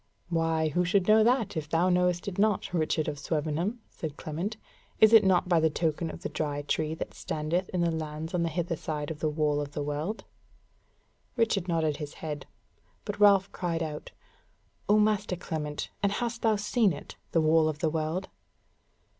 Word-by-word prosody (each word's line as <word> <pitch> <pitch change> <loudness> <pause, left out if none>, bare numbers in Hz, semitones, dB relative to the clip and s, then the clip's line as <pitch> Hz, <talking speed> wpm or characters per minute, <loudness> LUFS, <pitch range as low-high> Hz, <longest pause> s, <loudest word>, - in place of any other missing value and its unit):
"Why, 165 -2 +1
who 180 +4 +1
should 180 +1 +2
know 215 0 +6
that, 235 -4 +2
if 155 -2 -4
thou 170 +3 +2
knowest 180 0 +1
it 195 -1 -4
not, 200 -2 +1
Richard 155 -2 0
of 145 -2 -3
Swevenham?" 160 +9 -2
said 155 -3 -6
Clement: 175 +8 -4 0.4
"Is 220 +1 +7
it 225 - +9
not 185 -2 +3
by 175 -2 +4
the 160 0 +3
token 160 +1 -1
of - - -9
the - - -2
Dry 145 -2 -2
Tree 155 +2 -1
that - - -6
standeth 165 +4 -2
in 180 - -1
the 170 -1 +2
lands 155 +1 -4
on 180 - +1
the 170 - +1
hither 170 +1 -2
side 150 -1 -4
of 155 - -7
the 155 - 0
Wall 150 -1 +1
of 145 0 -6
the 145 - -2
World?" 150 +9 -3 1.1
Richard 220 -6 +1
nodded 160 -4 +1
his 150 -1 -7
head; 150 -2 -6 0.6
but 205 -1 -4
Ralph 200 -2 +5
cried 170 -2 -2
out: 150 -1 -6 0.8
"O 210 - +6
Master 210 -3 +2
Clement, 150 -4 -4
and 200 0 +2
hast 235 +1 -3
thou 220 -2 +3
seen 210 -1 +2
it, 145 - -9 0.2
the 165 - +3
Wall 155 0 +4
of 155 - -3
the 160 +1 0
World?" 160 +4 -2
165 Hz, 190 wpm, -28 LUFS, 155-195 Hz, 1.1 s, it